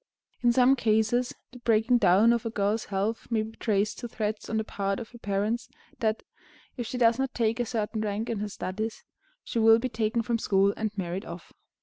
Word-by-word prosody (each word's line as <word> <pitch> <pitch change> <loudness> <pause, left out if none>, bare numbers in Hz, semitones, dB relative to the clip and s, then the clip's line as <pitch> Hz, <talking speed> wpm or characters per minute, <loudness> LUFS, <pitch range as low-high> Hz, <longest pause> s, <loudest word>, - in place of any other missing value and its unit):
In 240 -1 +4
some 255 +2 +5
cases, 225 +1 +1 0.2
the 250 - -12
breaking 235 +1 +3
down 205 +3 +5
of 235 - -1
a 230 - -2
girl's 215 0 0
health 205 +3 -2
may 225 -2 +1
be 220 +1 -9
traced 210 -2 0
to 240 - -5
threats 215 -2 -3
on 220 - -1
the 220 - 0
part 200 -2 -2
of 230 - -7
her 240 - -13
parents 205 +3 -1 0.3
that, 220 -2 0 0.5
if 240 -3 -4
she 250 - -4
does 235 0 +4
not 270 -1 -2
take 230 0 +1
a 240 - 0
certain 215 -1 -2
rank 215 +1 -2
in 230 -3 -2
her 210 0 -3
studies, 215 +3 -4 0.4
she 235 - -2
will 225 0 +7
be 255 +2 -2
taken 220 +1 0
from 235 0 -1
school 195 -1 +3
and 220 -1 -1
married 185 0 -3
off. 170 +1 -10
220 Hz, 215 wpm, -27 LUFS, 210-235 Hz, 0.5 s, will